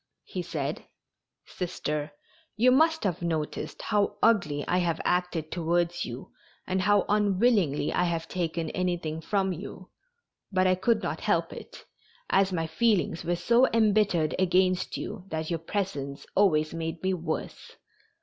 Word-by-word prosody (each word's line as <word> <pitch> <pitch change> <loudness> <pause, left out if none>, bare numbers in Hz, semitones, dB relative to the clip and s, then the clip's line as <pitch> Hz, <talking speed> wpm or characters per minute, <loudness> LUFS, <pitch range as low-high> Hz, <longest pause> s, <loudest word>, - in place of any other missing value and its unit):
He - - -5
said: - - -4 0.6
"Sister, 150 -4 -4 0.5
you 250 +3 +5
must 320 +4 +3
have 180 -5 -1
noticed 160 -3 -3
how 205 -2 +1
ugly 165 -11 +3
I 180 - +2
have 170 -2 0
acted 180 -3 0
towards 175 0 0
you 120 +2 -8 0.3
and 185 0 0
how 205 +1 +3
unwillingly 205 - +2
I 180 - +2
have 165 -1 -2
taken 165 -2 -2
anything 175 -3 -2
from 190 +2 0
you, 185 +1 -9 0.6
but 185 -1 +2
I 185 - +4
could 225 +6 +1
not - - -3
help - - 0
it, - - -11 0.5
as 195 0 +3
my 165 -3 -1
feelings 180 0 +1
were 175 +1 0
so 235 +9 +4
embittered 205 -8 +3
against 185 0 +2
you 185 - -6
that 160 -1 -4
your 165 - -1
presence 150 -6 -4
always 155 -6 +3
made 165 0 -4
me 190 0 +1
worse. 160 -3 -5
180 Hz, 145 wpm, -27 LUFS, 160-195 Hz, 0.6 s, you